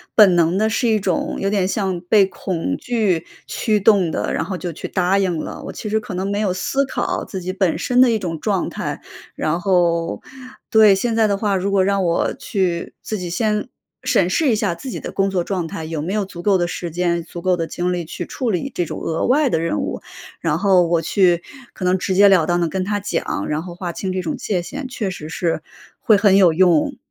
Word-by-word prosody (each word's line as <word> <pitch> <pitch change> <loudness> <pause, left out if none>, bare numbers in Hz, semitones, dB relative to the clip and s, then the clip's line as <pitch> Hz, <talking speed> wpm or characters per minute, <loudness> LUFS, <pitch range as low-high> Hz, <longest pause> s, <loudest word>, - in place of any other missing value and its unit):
本 200 -5 +7
能 170 +1 +2
地 215 +2 +2
是 230 +3 0
一 220 -1 +3
种， 190 -3 -1
有 195 - -1
点 195 -2 +1
像 190 -3 -1
被 195 +2 +4
恐 190 +6 -3
惧 210 -9 0 0.2
驱 215 -3 0
动 195 -4 +4
的， - - -2
然 - - 0
后 185 +2 -4
就 175 -2 -5
去 - - -6
答 185 +1 +1
应 185 -4 0
了， - - -6
我 - - -5
其 215 - -6
实 220 +1 +1
可 210 -3 -7
能 190 +2 -2
没 200 - -1
有 210 -3 +1
思 225 +9 0
考 - - -2
自 190 - -6
己 185 +1 -4
本 190 -3 +1
身 250 0 +2
的 255 - +6
一 225 - +2
种 170 -6 -4
状 195 +1 -1
态。 - - -4 0.4
然 165 +3 -1
后 170 -3 +1 0.5
对， 215 -3 +7
现 225 +4 -1
在 225 -1 +4
的 200 -1 0
话， 200 -1 0
如 190 +1 -1
果 195 -1 +3
让 200 0 +1
我 170 -1 +1
去 180 -4 -2
自 215 - -4
己 180 -1 -5
先， 210 +4 0 0.4
审 - - +2
视 315 -5 +2
一 - - +3
下 205 -4 0
自 260 +10 -8
己 - - -5
的 - - -6
工 195 0 +1
作 185 -2 0
状 180 -3 -2
态， 160 - -6
有 160 -1 -4
没 175 +6 -3
有 210 -1 +1
足 185 -3 -9
够 195 +1 +3
的 175 - +1
时 175 0 -4
间、 170 0 0
足 170 +1 -9
够 185 0 +1
的 165 -1 -2
精 175 +2 -2
力 175 -2 -2
去 175 +2 -6
处 250 +6 -3
理 205 +9 -2
这 175 - -1
种 - - -6
额 165 0 -1
外 280 +3 +3
的 165 - +1
任 165 -10 -1
务， - - -4 0.4
然 160 -2 0
后 185 -3 +4
我 170 -1 +2
去， 175 0 +2 0.3
可 - - -8
能 180 +1 +3
直 190 +1 -2
截 200 +1 +7
了 180 -5 +4
当 175 +1 +1
地 170 - +1
跟 185 +2 -2
他 205 +1 -1
讲， 190 - -2
然 150 +1 -1
后 175 -1 -8
划 180 -1 -4
清 185 +2 -4
这 185 - -1
种 165 -3 -3
界 185 -4 -1
限， 275 +10 -6
确 235 -6 -3
实 165 -4 -7
是， 165 0 -2 0.4
会 220 - +4
很 200 -1 +4
有 180 -4 +5
用。 175 -2 +3
185 Hz, 260 characters per minute, -20 LUFS, 175-205 Hz, 0.5 s, 本